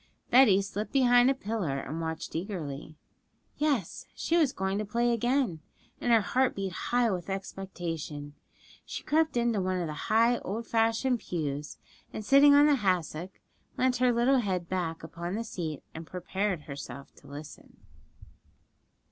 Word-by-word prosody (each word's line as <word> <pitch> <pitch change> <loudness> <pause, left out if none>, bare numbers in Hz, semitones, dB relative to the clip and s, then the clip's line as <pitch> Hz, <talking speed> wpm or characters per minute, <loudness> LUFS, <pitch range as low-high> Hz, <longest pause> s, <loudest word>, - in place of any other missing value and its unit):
Betty 215 -6 +6
slipped 205 +2 -4
behind 245 -2 +5
a 270 - +2
pillar, 205 - -2
and 155 +4 -5
watched 160 -1 -5
eagerly. 160 -5 -5 0.6
Yes, 280 - -1
she 330 - 0
was 310 -6 +4
going 190 -1 -2
to - - -1
play 235 +3 +1
again; 240 - +1 0.4
and 245 - 0
her 225 -1 +6
heart 255 +5 +1
beat 195 -1 -3
high 240 +3 +1
with 180 0 -4
expectation. 170 -6 -5 0.5
She - - -6
crept 315 -3 +1
into 235 -4 +1
one 185 0 -1
of 175 - -1
the 155 - -4 0.2
high, 230 +2 +4
old 220 +5 -4
fashioned 230 +3 +1
pews, 150 -6 -4 0.3
and 215 - -6
sitting 285 +3 +7
on 290 +1 +7
a 295 - +5
hassock, 185 - -1 0.4
leant 255 0 +2
her 250 0 +3
little 245 +3 +3
head 185 -6 -2
back 170 -3 -3
upon 170 +3 -5
the 230 - -2
seat, 165 -9 -5
and 160 0 -8
prepared 185 0 -2
herself 140 -1 -9
to - - -17
listen. 145 +1 -11
195 Hz, 155 wpm, -29 LUFS, 165-240 Hz, 0.6 s, sitting